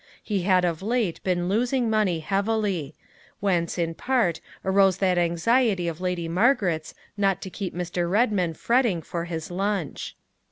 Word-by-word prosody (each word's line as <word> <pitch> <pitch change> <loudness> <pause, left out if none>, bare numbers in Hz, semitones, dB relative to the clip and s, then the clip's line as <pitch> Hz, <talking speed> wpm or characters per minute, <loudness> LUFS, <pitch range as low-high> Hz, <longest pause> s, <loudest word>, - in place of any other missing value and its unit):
He 205 -3 -1
had 185 -1 +3
of 170 -1 -1
late 220 -4 -1
been 175 -2 0
losing 240 +5 +1
money 210 -7 +1
heavily 195 -4 -1 0.4
whence, 180 -4 0
in 165 -1 -1
part, 230 -5 0 0.3
arose 190 -1 +4
that 185 -2 +2
anxiety 180 +3 +2
of 170 +1 -4
Lady 180 -2 -2
Margaret's 180 - +1 0.2
not 195 -2 +2
to 190 - -7
keep 190 -2 -5
Mr. 175 0 -2
Redmain 195 -6 +1
fretting 235 -9 +1
for 170 +2 -4
his 165 -1 -5
lunch. 195 -3 -2
185 Hz, 150 wpm, -25 LUFS, 170-210 Hz, 0.4 s, arose